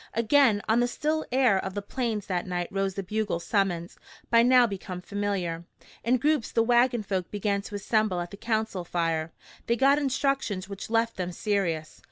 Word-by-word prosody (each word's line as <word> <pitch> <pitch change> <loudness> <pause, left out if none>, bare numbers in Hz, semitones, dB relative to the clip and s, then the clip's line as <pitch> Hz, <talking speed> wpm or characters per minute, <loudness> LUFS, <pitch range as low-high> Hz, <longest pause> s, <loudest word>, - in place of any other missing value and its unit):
Again 230 -2 +4
on 220 +2 +3
the 245 - +3
still 310 +5 -2
air 250 -7 +3
of 190 0 -5
the 205 - -2
Plains 220 -2 -2
that 180 -2 -2
night 175 -1 -2
rose 195 -1 -1
the 195 - -3
bugle 210 -2 -2
summons, 175 -3 -1 0.3
by 230 0 +6
now 250 +1 +6
become 190 -4 -5
familiar. 185 -3 -3 0.4
In 250 +2 +3
groups 295 -2 +1
the 230 - +3
wagon 240 0 +3
folk 190 -3 -2
began 205 -1 -1
to 205 +1 -8
assemble 210 -2 +1
at 175 0 -5
the - - -7
council 220 -3 -2
fire. 165 -2 -1 0.4
They 235 - +2
got 275 +3 +4
instructions 270 -8 -1
which 200 +1 -7
left 230 0 +1
them 180 -1 -3
serious. 170 -5 -2
205 Hz, 185 wpm, -27 LUFS, 185-235 Hz, 0.4 s, by